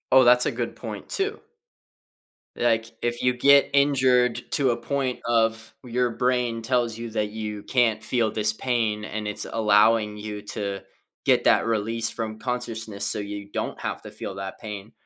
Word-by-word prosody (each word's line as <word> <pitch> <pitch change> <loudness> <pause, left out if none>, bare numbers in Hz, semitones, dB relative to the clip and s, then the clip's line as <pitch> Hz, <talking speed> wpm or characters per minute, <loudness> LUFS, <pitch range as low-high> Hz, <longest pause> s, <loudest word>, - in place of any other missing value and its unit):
Oh, 130 - +8
that's 125 0 +6
a - - +1
good - - -4
point, - - -8
too. 395 +1 -1 1.2
Like, 115 -1 +1
if 120 0 -2
you 125 0 +3
get 140 +3 +5
injured 130 -4 +3
to 140 -3 +2
a 115 - -1
point 130 +1 -2
of 115 -1 +1
your 125 -1 0
brain 125 -1 0
tells 120 -1 0
you 115 0 -5
that 105 -1 -1
you 105 -1 -5
can't 115 -4 +1
feel 115 -4 +1
this 105 +1 +1
pain, 110 -3 -1
and 105 0 -4
it's 105 - -2
allowing 105 0 +3
you 105 -1 -6
to 100 -2 -4 0.4
get - - +3
that - - +4
release 115 0 0
from 110 -2 -4
consciousness, 115 -4 -4
so - - 0
you 100 -1 -6
don't - - -4
have - - -4
to - - -9
feel 95 - -7
that 95 0 -6
pain, 105 -1 -7
115 Hz, 170 wpm, -25 LUFS, 105-125 Hz, 1.2 s, Oh